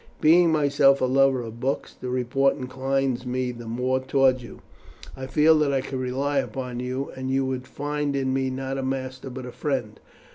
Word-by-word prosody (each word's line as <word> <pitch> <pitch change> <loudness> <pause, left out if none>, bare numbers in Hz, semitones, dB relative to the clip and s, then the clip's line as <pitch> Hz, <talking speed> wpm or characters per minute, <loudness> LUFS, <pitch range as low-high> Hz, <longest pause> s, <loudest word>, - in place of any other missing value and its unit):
Being 170 +2 +5
myself 140 -2 +4
a - - +2
lover 135 -1 +3
of 115 0 -8
books, 135 +2 -2
the 125 - -7
report 130 +2 +1
inclines 130 0 -1
me 125 0 -2
the 120 -1 -9
more 125 +3 0
toward 130 -1 +2
you. 120 - -11 0.5
I 130 0 -6
feel 155 +3 +4
that 150 -2 +2
I 135 -1 +1
could 130 0 -5
rely 135 +3 0
upon 125 -2 -4
you, 130 +2 -3
and 130 0 -4
you 135 0 +1
would 130 -1 -3
find 145 0 -2
in 130 -1 0
me 135 0 0
not 135 +1 -3
a - - -3
master 130 0 -4
but 130 0 -7
a 125 - -7
friend. 125 -7 -3
130 Hz, 195 wpm, -25 LUFS, 125-135 Hz, 0.5 s, Being